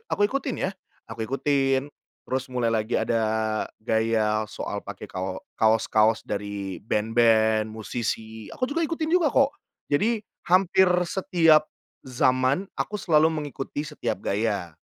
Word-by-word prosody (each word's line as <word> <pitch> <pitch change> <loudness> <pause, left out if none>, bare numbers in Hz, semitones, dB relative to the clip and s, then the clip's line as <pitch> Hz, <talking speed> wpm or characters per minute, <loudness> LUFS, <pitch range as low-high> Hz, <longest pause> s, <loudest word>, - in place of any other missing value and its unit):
aku 205 - +1
ikutin 275 -2 -2
ya, - - -3 0.4
aku 115 0 -4
ikutin, 135 +1 +1 0.4
terus 130 0 -1
mulai 125 -2 +1
lagi 110 0 -1
ada 115 -1 +1 0.6
gaya 110 -1 +1
soal 105 - -6
pakai - - -8
kao 95 0 -4 0.2
kaos-kaos 110 0 +3
dari 100 -2 -4
band-band, 110 0 +2
musisi, 110 -1 -4
aku 255 - -2
juga 330 +3 0
ikutin 315 0 -2
juga 335 -4 +3
kok. 275 0 +3 0.4
Jadi 215 +10 +1 0.3
hampir 185 +1 +4 0.2
setiap 165 -5 +4 0.4
zaman 130 +6 +1
aku 210 - -2
selalu 155 -2 +4
mengikuti 145 -2 -4
setiap 150 0 -4
gaya. 100 -6 -2
120 Hz, 125 wpm, -25 LUFS, 110-165 Hz, 0.6 s, hampir